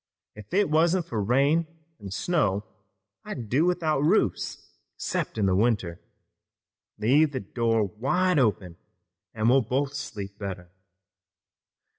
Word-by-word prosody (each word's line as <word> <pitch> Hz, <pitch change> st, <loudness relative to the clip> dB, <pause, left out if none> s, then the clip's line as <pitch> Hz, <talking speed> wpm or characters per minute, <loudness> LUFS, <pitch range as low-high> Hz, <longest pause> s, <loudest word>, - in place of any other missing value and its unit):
If 105 Hz, -1 st, -13 dB
it 195 Hz, -3 st, +2 dB
wasn't 170 Hz, +3 st, +3 dB
for 115 Hz, -10 st, -3 dB
rain 140 Hz, +9 st, +2 dB, 0.3 s
an' 100 Hz, -, -8 dB
snow 105 Hz, -, 0 dB, 0.6 s
I'd 115 Hz, -4 st, -7 dB
do 140 Hz, +8 st, +3 dB
without 160 Hz, -5 st, +1 dB
roofs 150 Hz, +3 st, 0 dB, 0.3 s
'cept -, -, -3 dB
in 95 Hz, -3 st, +2 dB
winter. 100 Hz, -5 st, 0 dB, 1.0 s
Leave 145 Hz, +7 st, +3 dB
the 130 Hz, -, -2 dB
door 115 Hz, +1 st, 0 dB
wide 150 Hz, -, +1 dB
open, 100 Hz, -8 st, 0 dB, 0.6 s
an' 110 Hz, 0 st, 0 dB
we'll 130 Hz, +3 st, +5 dB
both 135 Hz, +4 st, -1 dB
sleep 105 Hz, -8 st, -7 dB
better. 90 Hz, -3 st, -6 dB
120 Hz, 120 wpm, -26 LUFS, 100-155 Hz, 1.0 s, we'll